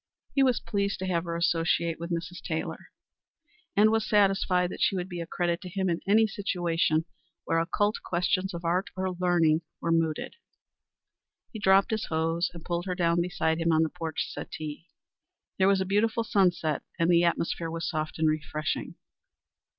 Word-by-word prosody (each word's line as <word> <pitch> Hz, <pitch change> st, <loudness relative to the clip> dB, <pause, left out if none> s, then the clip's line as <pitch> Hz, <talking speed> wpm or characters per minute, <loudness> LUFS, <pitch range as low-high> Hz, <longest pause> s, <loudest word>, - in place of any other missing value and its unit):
He 275 Hz, -, +3 dB
was 255 Hz, -3 st, +3 dB
pleased 200 Hz, -1 st, -1 dB
to 190 Hz, -, -4 dB
have 175 Hz, -2 st, 0 dB
her 170 Hz, 0 st, -3 dB
associate 170 Hz, -1 st, +1 dB
with 170 Hz, +1 st, -5 dB
Mrs. 170 Hz, 0 st, -4 dB
Taylor, 160 Hz, -1 st, -4 dB, 0.9 s
and 215 Hz, +2 st, +5 dB
was 225 Hz, -1 st, +2 dB
satisfied 195 Hz, -3 st, +3 dB
that -, -, -7 dB
she -, -, +3 dB
would 180 Hz, -1 st, -2 dB
be 175 Hz, -2 st, -5 dB
a 165 Hz, -, -6 dB
credit 175 Hz, +1 st, -1 dB
to 185 Hz, -, -7 dB
him 190 Hz, 0 st, -1 dB
in 165 Hz, -, -1 dB
any 220 Hz, +3 st, +5 dB
situation 175 Hz, -6 st, 0 dB, 0.4 s
where 165 Hz, -, +1 dB
occult 205 Hz, +6 st, +1 dB
questions 185 Hz, +2 st, 0 dB
of 170 Hz, 0 st, -7 dB
art 180 Hz, +4 st, +1 dB
or 190 Hz, 0 st, -1 dB
learning 175 Hz, -3 st, +2 dB, 0.2 s
were 165 Hz, -, -1 dB
mooted. 165 Hz, -, 0 dB, 1.2 s
He 220 Hz, -, -6 dB
dropped 195 Hz, +1 st, +4 dB
his 220 Hz, -1 st, -1 dB
hose 165 Hz, +2 st, 0 dB
and 170 Hz, -2 st, -11 dB
pulled 175 Hz, +1 st, -2 dB
her 180 Hz, -, -1 dB
down 170 Hz, -2 st, +2 dB
beside 165 Hz, -2 st, 0 dB
him 165 Hz, 0 st, +2 dB
on 160 Hz, 0 st, +4 dB
the 160 Hz, -, 0 dB
porch 165 Hz, -2 st, -3 dB
settee. 155 Hz, +2 st, -7 dB, 0.7 s
There 190 Hz, -, +5 dB
was 195 Hz, -1 st, +3 dB
a -, -, 0 dB
beautiful 220 Hz, +4 st, +1 dB
sunset, 175 Hz, -8 st, +1 dB, 0.2 s
and 165 Hz, -, +2 dB
the 170 Hz, 0 st, +5 dB
atmosphere 170 Hz, -1 st, 0 dB
was 165 Hz, 0 st, -3 dB
soft 155 Hz, 0 st, -3 dB
and 160 Hz, 0 st, +2 dB
refreshing. 155 Hz, 0 st, -2 dB
175 Hz, 180 wpm, -28 LUFS, 165-190 Hz, 1.2 s, and